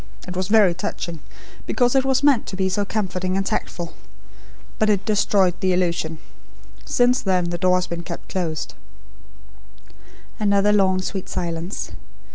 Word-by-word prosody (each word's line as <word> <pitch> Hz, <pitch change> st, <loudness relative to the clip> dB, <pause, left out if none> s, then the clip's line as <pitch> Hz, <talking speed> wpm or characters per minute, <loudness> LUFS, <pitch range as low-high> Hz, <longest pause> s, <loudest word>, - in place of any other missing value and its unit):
It 180 Hz, -, -6 dB
was 185 Hz, 0 st, -1 dB
very 205 Hz, -4 st, +5 dB
touching, 170 Hz, -1 st, -4 dB, 0.5 s
because 245 Hz, -1 st, +2 dB
it 270 Hz, -1 st, +4 dB
was 265 Hz, 0 st, +1 dB
meant 280 Hz, -5 st, +4 dB
to -, -, -5 dB
be 190 Hz, 0 st, 0 dB
so 205 Hz, +2 st, 0 dB
comforting 185 Hz, -3 st, -1 dB
and 195 Hz, -, 0 dB
tactful. 170 Hz, -3 st, -3 dB, 0.9 s
But 215 Hz, -, +3 dB
it 200 Hz, -2 st, +1 dB
destroyed 200 Hz, -3 st, +3 dB
the 185 Hz, -1 st, +2 dB
illusion! 170 Hz, -3 st, 0 dB, 0.7 s
Since 245 Hz, +1 st, +3 dB
then 180 Hz, -3 st, +1 dB
the 175 Hz, -, -3 dB
door 185 Hz, -1 st, +4 dB
has 180 Hz, -, -1 dB
been 170 Hz, -1 st, -5 dB
kept 170 Hz, 0 st, -7 dB
closed." 155 Hz, -, -3 dB, 1.7 s
Another 205 Hz, 0 st, +3 dB
long 190 Hz, -2 st, +3 dB
sweet 190 Hz, -1 st, -4 dB
silence. 170 Hz, +1 st, -3 dB
185 Hz, 150 wpm, -22 LUFS, 175-210 Hz, 1.7 s, very